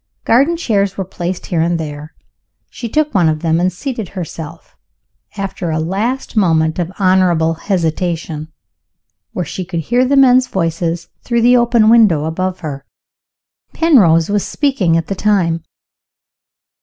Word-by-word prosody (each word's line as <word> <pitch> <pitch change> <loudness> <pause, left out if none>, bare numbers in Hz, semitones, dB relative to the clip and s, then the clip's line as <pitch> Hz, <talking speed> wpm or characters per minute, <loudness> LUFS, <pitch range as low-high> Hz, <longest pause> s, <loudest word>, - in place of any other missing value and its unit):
Garden 280 +9 +3
chairs 200 - 0
were 195 - -2
placed 180 0 -5
here 170 -2 -1
and 170 0 0
there. 150 0 -7 0.6
She 235 - -6
took 300 +4 0
one 175 -5 +3
of 155 -1 -2
them, 165 -1 +1
and 180 +1 +1
seated 220 +1 -5
herself 165 -3 -8 0.6
after 195 -3 -4
a 160 - -1
last 205 +13 -2
moment 160 -5 +2
of 175 0 -2
honorable 185 -4 +2
hesitation 165 -3 -3 0.8
where 180 - -3
she 185 - -5
could 170 -2 -4
hear 245 - +1
the 275 +2 +1
men's 255 -1 +5
voices 165 -2 -2 0.2
through 235 -1 0
the 245 +1 +5
open 240 -2 +3
window 215 -10 +4
above 185 +3 -3
her. 140 -4 -6 0.9
Penrose 185 - +4
was 205 -1 +1
speaking 220 - 0
at 165 - -1
the 195 - -3
time. 185 -5 0
180 Hz, 145 wpm, -16 LUFS, 165-225 Hz, 0.9 s, men's